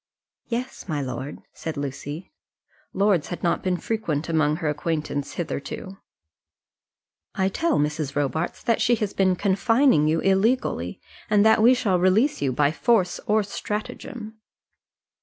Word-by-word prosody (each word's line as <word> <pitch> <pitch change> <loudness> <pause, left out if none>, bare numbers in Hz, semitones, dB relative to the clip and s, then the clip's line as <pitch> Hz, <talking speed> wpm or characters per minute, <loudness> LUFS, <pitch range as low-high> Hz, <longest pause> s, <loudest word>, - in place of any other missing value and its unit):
"Yes, 240 -2 -4
my 150 -2 -1
lord," 130 +1 -5
said 160 -2 -5
Lucy. 145 - -6 0.6
Lords 195 -5 +2
had 175 - -6
not 170 - +1
been 185 -1 0
frequent 170 -8 -2
among 155 -2 +2
her 160 -1 -3
acquaintance 150 -1 -2
hitherto. 180 +3 -5 1.4
"I 190 0 +1
tell 335 - 0
Mrs. 150 -1 -1
Robarts 145 +4 -1
that 230 - +1
she 240 +1 +4
has 210 -3 -3
been 185 -1 +2
confining 200 - +3
you 160 +1 +2
illegally, 205 +8 +1 0.3
and 210 0 +4
that 220 0 +5
we 245 +3 +7
shall 195 -7 +1
release 190 - +3
you 135 -2 +1
by 145 +3 +2
force 195 0 +1
or 215 0 +3
stratagem." 215 +2 -6
185 Hz, 140 wpm, -24 LUFS, 150-215 Hz, 1.4 s, we